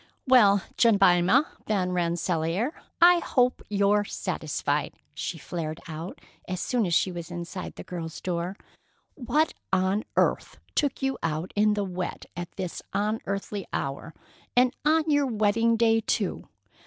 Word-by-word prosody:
"Well, 210 -7 +6
Jemima 200 - +5 0.2
Van 190 -4 0
Rensselaer, 175 - 0 0.3
I 345 0 +7
hope 250 -6 +1
you're 205 0 +3
satisfied!" - - -2 0.2
she - - -4
flared 160 -2 -5
out, 165 +3 -7 0.3
as 185 -1 -3
soon 235 -2 0
as 170 - +1
she 185 - +2
was 170 -2 -7
inside 175 +1 -6
the - - -8
girl's 165 -3 -6
door. 180 +2 -3 0.6
"What 290 +4 +1 0.2
on 190 +3 +1
earth - - +1 0.2
took 285 -3 0
you 270 0 0
out 160 +2 -2
in 210 0 +3
the 205 - 0
wet 180 -1 -4
at 175 -1 -6
this 185 -3 -5
unearthly 205 -1 -2
hour? 140 +4 -4 0.4
And 250 0 +4
on 315 +2 +3
your 290 -1 +3
wedding 225 0 +2
day, 225 0 +4
too! - - -2
200 Hz, 140 wpm, -27 LUFS, 175-230 Hz, 0.6 s, I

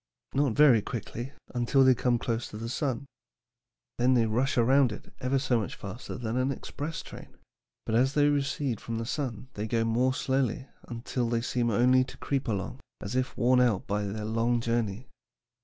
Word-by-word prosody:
"Not 135 -3 +2
very 135 -5 +6
quickly 120 +3 -5 0.2
until 125 +2 +3
they 130 0 +7
come 125 0 +1
close 115 0 -2
to 105 - -8
the 115 +1 -5
sun. 130 0 -2 0.9
Then 125 +2 +4
they 115 -2 +4
rush 120 +5 0
around 130 +1 +4
it 105 - -10
ever 130 +2 +1
so 130 -3 +1
much 105 - -4
faster 100 +5 -7
than 120 -1 -3
an 130 +2 +1
express 145 +4 -5
train; - - -12 0.5
but 110 - -2
as 130 +4 +3
they 145 -1 +5
recede 140 -4 0
from 115 -1 -4
the 115 - -3
sun 130 -2 -4
they 105 +1 -4
go 115 +1 +1
more 125 +3 +2
slowly 130 -2 0 0.2
until 120 0 -3
they 115 -1 +1
seem 120 0 0
only 125 +4 +4
to 130 - -11
creep 140 -1 -2
along, 115 +4 -3 0.2
as 105 +4 -5
if 130 0 -1
worn 125 +1 +4
out 115 -6 +2
by 105 +1 -1
their 105 +2 -4
long 115 +2 +1
journey. 115 0 -1
120 Hz, 190 wpm, -28 LUFS, 115-130 Hz, 0.9 s, they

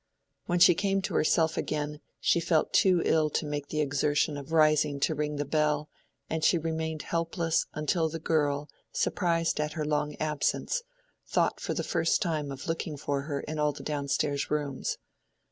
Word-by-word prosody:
When 175 - +1
she 175 0 +8
came 195 +2 0
to - - -3
herself 160 +1 +2
again, 150 -1 -2 0.2
she - - +3
felt 165 -1 +1
too 180 -3 +4
ill 155 -1 +3
to 155 - -1
make 145 -1 -3
the 155 0 -1
exertion 145 +1 +1
of 145 +2 -8
rising 155 -2 +3
to 160 - +2
ring 150 0 -2
the 145 0 -2
bell, 150 0 +1 0.4
and 160 0 -2
she 175 - +5
remained 160 -1 -3
helpless 165 0 0
until 160 +2 +1
the 165 - -4
girl, 150 -3 0 0.2
surprised 165 -4 0
at 150 0 -1
her 155 -2 -2
long 150 0 -1
absence, 155 - -1 0.5
thought - - +1
for - - -3
the - - -1
first 165 -1 +1
time 155 -7 -1
of 135 -1 -7
looking 165 -2 -3
for 140 0 -2
her 140 -1 -3
in 155 0 -5
all 150 -1 +2
the - - -9
down 145 -2 -3
stairs 140 0 0
rooms. 145 -3 -2
155 Hz, 180 wpm, -29 LUFS, 145-165 Hz, 0.5 s, she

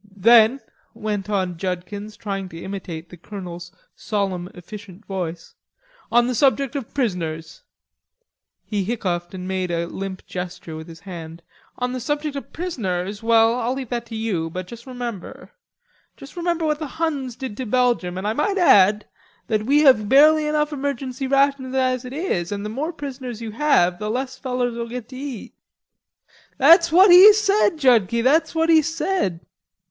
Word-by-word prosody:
"Then," 230 +5 +5 0.3
went 210 -3 -4
on 185 -4 -1
Judkins, 190 +4 -5
trying 195 -3 -4
to 165 - -10
imitate 175 -4 -7
the 180 - -12
Colonel's 175 -2 -8 0.2
solemn 190 -4 -3
efficient 200 +2 -11
voice, 175 -4 -5 0.6
"'On 240 +1 +4
the 250 - -1
subject 275 +1 +1
of 270 -5 -5
prisoners'" 165 - -3 1.0
he 205 -3 -2
hiccoughed 180 -5 -3
and 185 0 -6
made 185 -1 -2
a 170 0 -1
limp 190 +2 -7
gesture 180 -3 -7
with 160 0 -8
his 165 -1 -12
hand 165 -3 -9 0.3
"'On 250 0 -2
the 255 - -4
subject 295 +3 -3
of 280 - -7
prisoners, 205 - -3
well, 225 0 +4
I'll 245 +2 -1
leave 265 -3 -6
that 240 -1 -4
to 225 - -8
you, 200 -8 -2
but 185 +2 -6
juss 235 +6 -12
remember... 240 -6 -7 0.7
juss 275 +2 -13
remember 340 -1 -1
what 300 -1 0
the 310 - -4
Huns 285 -7 -2
did 260 -5 -6
to 260 - -4
Belgium, 235 -7 +1
an' 190 - -5
I 215 - 0
might 395 - 0
add 210 - +5 0.4
that 215 -1 0
we 290 +2 +4
have 215 -8 +5
barely 305 +2 +6
enough 300 0 0
emergency 270 -2 -3
rations 275 -1 +1
as 255 -1 0
it 250 - -7
is, 240 - -2
and 205 0 -4
the - - -3
more 285 +9 -3
prisoners 260 -7 -7
you 225 -2 -6
have 210 -9 +2
the 210 - -3
less 260 +3 -3
you - - -24
fellers'll 245 -3 -2
git 245 -1 -7
to 260 - -10
eat.'" 265 -4 -7 1.0
"That's 335 +4 +6
what 370 +3 +7
he 370 +4 +10
said, 410 -4 +2
Judkie; 235 -5 +3
that's 315 +6 +2
what 325 0 +1
he 320 -1 +6
said." 315 - -2
235 Hz, 170 wpm, -22 LUFS, 190-275 Hz, 1.0 s, he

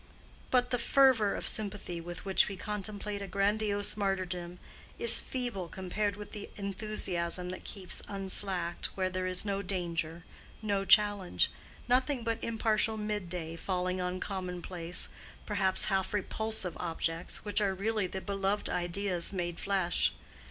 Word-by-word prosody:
But 250 -1 +2
the 245 - +1
fervor 235 -5 +4
of - - -3
sympathy 200 -5 0
with 175 +2 -7
which 190 -1 +4
we 195 - -5
contemplate 210 0 -3
a 200 - -5
grandiose 205 +1 +1
martyrdom 185 -3 -2 0.4
is 470 - +8
feeble 245 -9 -3
compared 195 +3 -2
with 210 0 -9
the 210 - -7
enthusiasm 190 -3 -1
that 185 - -7
keeps 190 -3 -4
unslacked 190 -3 0
where 185 -1 0
there 185 0 -2
is 185 +2 +2
no 200 -1 -1
danger, 170 -3 -2 0.4
no 200 -2 -1
challenge—nothing 220 +6 +2
but 230 0 -2
impartial 220 -1 +1
midday 180 -6 -3
falling 185 +1 -1
on 180 +1 -2
commonplace, 180 -2 0 0.4
perhaps 195 -3 +3
half 190 +1 0
repulsive, 215 -2 0
objects 165 +1 -1
which 205 0 0
are 195 -2 +1
really 210 0 0
the 190 +1 -5
beloved 200 +1 -1
ideas 175 0 0
made 175 -3 -3
flesh. 190 -3 +1
195 Hz, 135 wpm, -31 LUFS, 180-210 Hz, 0.4 s, is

